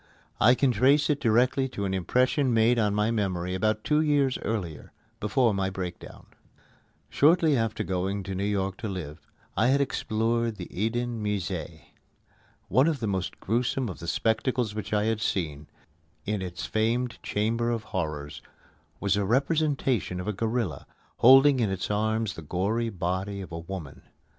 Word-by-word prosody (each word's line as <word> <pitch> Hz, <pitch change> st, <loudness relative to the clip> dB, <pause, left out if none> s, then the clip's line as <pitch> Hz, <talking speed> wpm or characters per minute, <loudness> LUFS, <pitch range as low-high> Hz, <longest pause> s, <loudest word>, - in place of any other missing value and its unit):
I 120 Hz, +3 st, +6 dB
can 135 Hz, 0 st, +2 dB
trace 135 Hz, +7 st, +3 dB
it 145 Hz, -, 0 dB
directly 125 Hz, +3 st, +2 dB
to 100 Hz, -5 st, -4 dB
an 95 Hz, -, -1 dB
impression 125 Hz, -, +1 dB
made 115 Hz, +2 st, +4 dB
on 105 Hz, -2 st, +1 dB
my 105 Hz, +2 st, +1 dB
memory 90 Hz, -5 st, -1 dB
about 110 Hz, +3 st, 0 dB
two 150 Hz, 0 st, +2 dB
years 145 Hz, -4 st, +2 dB
earlier, 90 Hz, -9 st, -4 dB, 0.3 s
before 115 Hz, +1 st, +2 dB
my 95 Hz, -1 st, 0 dB
breakdown. 95 Hz, -2 st, -7 dB, 0.8 s
Shortly 160 Hz, 0 st, +4 dB
after 115 Hz, -3 st, -1 dB
going 95 Hz, +2 st, -2 dB
to 95 Hz, 0 st, -5 dB
New 95 Hz, +1 st, -2 dB
York 100 Hz, -2 st, -1 dB
to 115 Hz, -, -5 dB
live, 85 Hz, -5 st, -6 dB, 0.4 s
I 110 Hz, -, +3 dB
had 135 Hz, +2 st, +3 dB
explored 115 Hz, -3 st, 0 dB
the 90 Hz, -4 st, -7 dB
Eden 115 Hz, +2 st, -2 dB
Musée. 105 Hz, -6 st, -3 dB, 0.9 s
One 130 Hz, -, +4 dB
of 160 Hz, -4 st, 0 dB
the 115 Hz, -, -3 dB
most 95 Hz, -3 st, -2 dB
gruesome 120 Hz, +3 st, -1 dB
of 90 Hz, -, -8 dB
the 85 Hz, -, -8 dB
spectacles 115 Hz, +3 st, 0 dB
which 105 Hz, -2 st, -5 dB
I 105 Hz, -1 st, +2 dB
had 110 Hz, 0 st, 0 dB
seen 75 Hz, -8 st, -2 dB, 0.6 s
in 105 Hz, -1 st, -1 dB
its 90 Hz, -2 st, -5 dB
famed 115 Hz, +3 st, -1 dB
Chamber 115 Hz, +3 st, 0 dB
of 115 Hz, -2 st, -2 dB
Horrors 75 Hz, -8 st, -4 dB, 0.6 s
was 100 Hz, -1 st, +1 dB
a 105 Hz, -, 0 dB
representation 135 Hz, -, 0 dB
of 90 Hz, -, -5 dB
a 105 Hz, -, 0 dB
gorilla, 110 Hz, -3 st, -2 dB, 0.3 s
holding 135 Hz, +2 st, +7 dB
in 110 Hz, -4 st, +1 dB
its 95 Hz, +2 st, -3 dB
arms 110 Hz, 0 st, 0 dB
the 80 Hz, -, -9 dB
gory 100 Hz, +9 st, -1 dB
body 95 Hz, +1 st, -3 dB
of 95 Hz, -2 st, -8 dB
a 85 Hz, -, -5 dB
woman. 85 Hz, -4 st, -8 dB
110 Hz, 165 wpm, -27 LUFS, 95-120 Hz, 0.9 s, holding